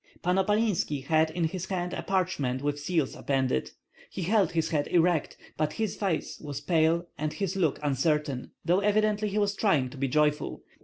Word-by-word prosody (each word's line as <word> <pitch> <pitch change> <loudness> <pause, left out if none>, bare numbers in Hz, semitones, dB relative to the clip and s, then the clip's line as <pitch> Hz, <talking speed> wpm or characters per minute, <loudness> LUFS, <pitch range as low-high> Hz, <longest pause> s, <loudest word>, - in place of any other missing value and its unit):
Pan 180 +2 +2
Opalinski 195 -9 +1
had 160 +1 +3
in 170 +2 -2
his 180 +3 -2
hand 180 -2 -2
a - - -3
parchment 150 -9 -1
with 145 0 -1
seals 155 -1 0
appended; 130 - 0 0.4
he 185 - -5
held 195 -2 +2
his 165 -1 0
head 145 -2 0
erect, 175 -2 +2 0.2
but 155 0 0
his 220 -2 -2
face 190 -6 -2
was 145 -2 -5
pale 165 +3 +2
and 155 0 -2
his 195 -2 -2
look 165 -7 +1
uncertain, 145 -1 0 0.2
though 175 +3 +3
evidently 210 +1 +2
he 200 - -3
was 205 -1 +2
trying 150 - +2
to - - -10
be 135 +1 0
joyful. 150 +2 0
165 Hz, 185 wpm, -28 LUFS, 145-190 Hz, 0.4 s, had